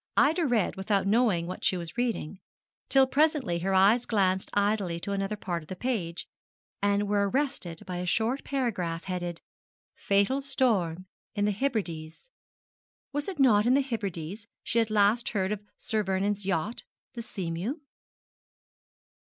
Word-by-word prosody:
Ida 320 +2 +4
read 230 -8 +1
without 195 0 +1
knowing 205 -5 +3
what 180 +2 -6
she 185 - +3
was 170 -2 -7
reading, 230 -7 -2 0.5
till 270 -1 +6
presently 275 - +2
her 190 +3 -1
eyes 205 +6 +5
glanced 190 -3 +1
idly 200 -4 +1
to 200 - -4
another 195 +1 -1
part 175 -4 -3
of 155 - -16
the 185 - -4
page, 180 -7 -3 0.5
and 200 0 +2
there - - -1
were 200 0 +1
arrested 255 - -2
by 180 -1 -4
a 180 0 -3
short 230 +8 0
paragraph 185 -12 -2
headed, 175 -2 -4 0.5
FATAL 200 +8 +1
STORM 210 -11 0 0.3
IN 205 -1 +1
THE 210 - +2
HEBRIDES. 195 - -3 0.8
Was 290 0 -2
it 385 -4 -4
not 230 -6 +5
in 255 - +5
the 280 - +4
Hebrides 205 - -4 0.2
she 235 - +1
had 225 -1 +1
last 215 +3 +3
heard 190 -2 -1
of 210 -1 -2 0.2
Sir 220 -1 -1
Vernon's 195 +1 -1
yacht 195 +5 -1 0.3
the 235 - -5
_Seamew? 190 - -3
205 Hz, 155 wpm, -28 LUFS, 185-240 Hz, 0.8 s, till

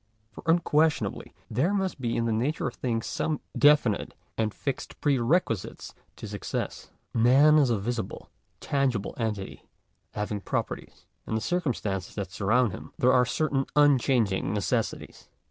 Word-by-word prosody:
For - - -10
unquestionably 160 -2 +2 0.2
there 155 - +1
must 190 -7 -2
be 115 -2 -1
in 115 - 0
the 115 - 0
nature 125 +8 0
of 125 - -2
things 115 -3 -2
some 155 -2 -2 0.2
definite 145 -8 +3 0.2
and 110 -1 0
fixed 135 +5 -5
pre 140 -4 +2
requisites 120 - -1 0.2
to - - -8
success. - - -4 0.2
Man 135 +7 +6
is 140 -4 +3
a 115 - +2
visible, 110 0 -4 0.3
tangible 130 -7 0
entity, 105 -4 -4 0.5
having 105 -1 -3
properties. - - -4 0.2
In 110 - -2
the - - +1
circumstances 115 - -2
that 100 -4 -4
surround 110 +4 +2
him - - -9
there 125 - +4
are 125 -1 +4
certain 140 -1 0
unchanging 125 -9 +3
necessities. 110 +3 -2
125 Hz, 145 wpm, -27 LUFS, 110-145 Hz, 0.5 s, Man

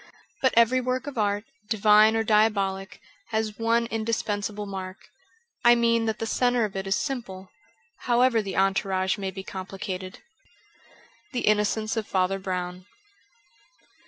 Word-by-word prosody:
But 260 - +2
every 240 +2 +5
work 255 +1 -2
of 280 -5 -5
art, 205 0 0 0.3
divine 215 0 +5
or 225 - +1
diabolic, 205 -3 +1 0.3
has 220 -1 -2
one 230 +1 +2
indispensable 215 -2 -2
mark 190 -1 -6 0.4
— 460 +1 -40
I 240 0 +7
mean 230 -1 +2
that 220 - -1
the 225 - -3
centre 245 0 +1
of 200 - -7
it 195 0 -4
is 195 - +2
simple, 195 -9 -5 0.6
however 240 -1 +3
the 195 -2 -5
entourage 190 0 +1
may 195 -1 -2
be 190 0 -7
complicated. 185 -1 -6 1.2
^The 245 - -1
Innocence 215 +1 +1
of 220 - -2
Father 190 +1 0
Brown.' 180 -1 -4
210 Hz, 140 wpm, -26 LUFS, 195-230 Hz, 1.2 s, I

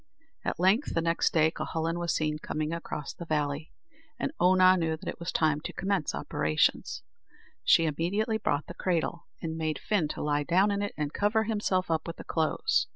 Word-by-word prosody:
At - - -2
length, 195 +10 +3
the 165 - +2
next 165 0 +2
day, 160 -1 +4
Cuhullin 165 +1 -2
was 170 -1 0
seen 155 -1 0
coming 155 +1 -3
across 160 -3 -5
the 170 - -9
valley, 150 0 -1 0.5
and - - -2
Oonagh 185 0 +6
knew 160 -1 0
that - - -11
it - - -4
was 170 - -3
time 155 -2 +2
to - - -6
commence 190 -5 -1
operations. 75 0 0 0.6
She 165 - +5
immediately 195 +9 0
brought 145 -7 0
the - - -8
cradle, 170 -1 -1 0.2
and 160 -1 -3
made 155 -2 -1
Fin 200 -8 0
to - - -5
lie 145 0 +1
down 185 +7 +3
in 200 0 -1
it, 205 - -3
and 150 -1 -2
cover 210 +2 +2
himself 205 -5 0
up 160 +1 0
with 170 - -5
the - - -9
clothes. 160 - +1
165 Hz, 195 wpm, -29 LUFS, 155-185 Hz, 0.6 s, Oonagh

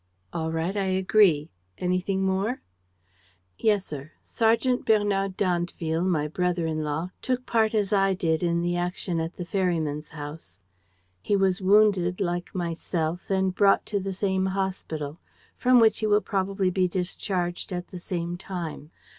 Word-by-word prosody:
"All 160 -1 -2
right, 165 +4 -1
I 200 -1 0
agree. 185 -4 +3 0.3
Anything 185 +2 0
more?" 195 +6 -1 1.0
"Yes, 205 -3 +2
sir, 145 +1 -8
Sergeant 230 +3 +1
Bernard 200 -3 +1
d'Andeville, 175 -2 0
my 155 -5 +1
brother 175 +1 -1
in 155 -1 -1
law, 155 +4 -2
took 255 0 -1
part 220 -1 +2
as 205 -1 +1
I 195 -1 +3
did 165 -4 0
in 170 -1 +1
the 175 0 0
action 175 0 -2
at 165 +2 -3
the 180 - -5
ferryman's 165 -5 -1
house. 145 - -9 0.6
He 200 - +1
was 195 -1 +2
wounded 190 -2 +4
like 175 -1 -2
myself 170 -1 -2
and 190 -1 +1
brought 200 +1 +4
to 205 - -1
the 195 0 -3
same 190 0 0
hospital, 180 -5 -3 0.4
from 250 0 +5
which 225 -1 +4
he 215 - 0
will 210 0 +5
probably 195 -2 0
be 185 0 +2
discharged 180 0 -2
at 180 -1 -4
the 180 - -7
same 175 -1 -3
time. 170 -5 -6
185 Hz, 155 wpm, -26 LUFS, 170-195 Hz, 1.0 s, from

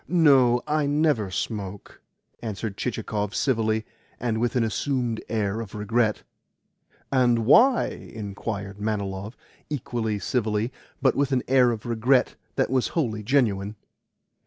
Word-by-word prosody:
"No, 135 -8 +5
I 150 -1 +1
never 145 -8 +2
smoke," 100 0 -5 0.4
answered 110 -2 -4
Chichikov 105 -3 -3
civilly, 110 -4 +1 0.3
and 115 -2 -1
with 120 0 0
an 120 - +3
assumed 120 0 -1
air 110 -1 -1
of 110 -2 -8
regret. 110 +1 0 0.9
"And 120 -4 +3
why?" 235 - +6 0.3
inquired 100 -2 -5
Manilov 100 0 -3 0.3
equally 120 -6 -2
civilly, 110 +1 -1 0.3
but 130 - +5
with 140 -1 +1
a 130 0 +3
regret 120 +3 +1 0.2
that - - +1
was 130 -2 +2
wholly 110 -9 0
genuine. 105 -4 +1
115 Hz, 115 wpm, -25 LUFS, 105-130 Hz, 0.9 s, why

